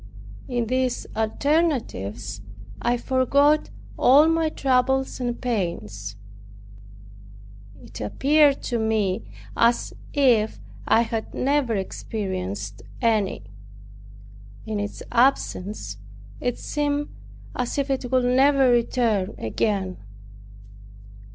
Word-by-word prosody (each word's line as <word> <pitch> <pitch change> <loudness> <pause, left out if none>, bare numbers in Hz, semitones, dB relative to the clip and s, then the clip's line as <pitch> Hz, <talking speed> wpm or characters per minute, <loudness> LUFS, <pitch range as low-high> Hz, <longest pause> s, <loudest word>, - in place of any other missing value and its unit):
In 240 -2 -1
these 255 +1 -1
alternatives 220 - -1 0.4
I 240 +1 +1
forgot 280 +4 +2 0.3
all 285 +5 +6
my 325 -1 +2
troubles 265 -2 +1
and 245 -1 -2
pains. 105 - -3 1.7
It - - -10
appeared 285 - +3
to 240 -2 -1
me 205 - -1 0.2
as 235 +1 +2 0.2
if 245 -7 +3 0.3
I 225 - +5
had 225 -1 -3
never 270 -4 +1
experienced 105 - -4 0.2
any. 215 - +1 1.2
In 215 -1 -3
its 205 0 -5
absence, 210 - +1 0.4
it 245 - -2
seemed 290 0 -1 0.5
as 250 +2 -2
if 280 0 0
it 260 -2 -2
would 255 -1 +3
never 265 +1 +4
return 230 -4 +1
again. 190 - -1
240 Hz, 95 wpm, -24 LUFS, 200-270 Hz, 1.7 s, all